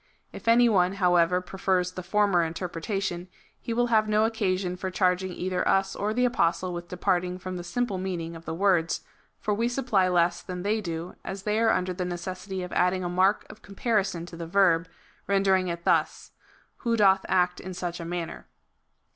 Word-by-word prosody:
If - - -10
any 240 +1 +6
one, 185 -4 +3
however, 180 -2 +3
prefers 185 0 -1
the 185 - -6
former 195 0 +2
inter 165 +2 -3
pretation, 175 +1 -3 0.3
he - - -5
will 240 +1 +1
liave 215 -2 +3
no 215 +1 +3
occasion 190 -5 -1
for 190 0 -4
charging 185 0 +1
either 180 +1 -2
us 195 0 +2
or 210 +1 -1
the 250 +3 +2
Apostle 180 -6 +1
with 175 0 -6
departing 180 0 -1
from 185 0 -6
the 175 - -5
simple 200 +2 -2
meaning 170 -3 -4
of 165 0 -11
the - - -4
words, 180 -3 +2 0.4
for 210 - -1
we 230 +3 0
supply 245 -7 +1
less 175 0 +2
than 180 0 -6
they 215 +2 0
do, 170 -2 -5
as 195 0 -6
they 210 +1 0
are 225 0 +3
under 185 -3 +1
the 180 0 -3
necessity 185 +2 -5
of 180 - -7
adding 180 +1 +2
a 175 - -2
mark 185 +3 +2
of 215 - -13
comparison 200 -4 -1
to 175 - -10
the 165 0 -6
verb, 180 -2 +3 0.4
ren 195 -1 +2
dering 190 -1 +3
it 170 -1 -4
thus: - - +1 0.2
" - - -34
who 230 -1 0
doth 195 -2 +4
act 180 -1 +2
in 185 0 -7
such 175 0 -4
a - - -5
manner." 170 -1 -5
185 Hz, 200 wpm, -27 LUFS, 175-200 Hz, 0.4 s, any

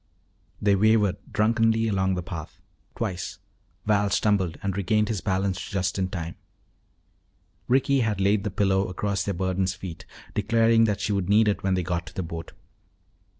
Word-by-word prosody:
They 100 -1 +3
wavered 105 -1 +3
drunkenly 115 +1 +2
along 95 -2 +1
the 90 - -3
path. 85 -4 -7 0.4
Twice 90 -3 -4 0.5
Val 105 -1 +2
stumbled 95 -4 +1
and 100 -2 -1
regained 105 +2 +1
his 105 -5 -2
balance 95 -1 -1
just 95 -1 -2
in 95 -1 0
time. 85 -2 -4 1.3
Ricky 135 +2 +3
had 110 -5 0
laid 100 +1 +2
the 105 - -1
pillow 95 -1 +1
across 100 +2 -2
their 100 - -2
burden's 95 +1 0
feet, 90 -3 -8 0.3
declaring 115 +2 +3
that 105 -2 -1
she 105 - -1
would 100 -2 -1
need 105 +1 +5
it 105 - +1
when 95 -1 +1
they 90 - 0
got 85 0 -2
to - - -11
the 95 - -2
boat. 85 0 -7
100 Hz, 165 wpm, -25 LUFS, 95-105 Hz, 1.3 s, need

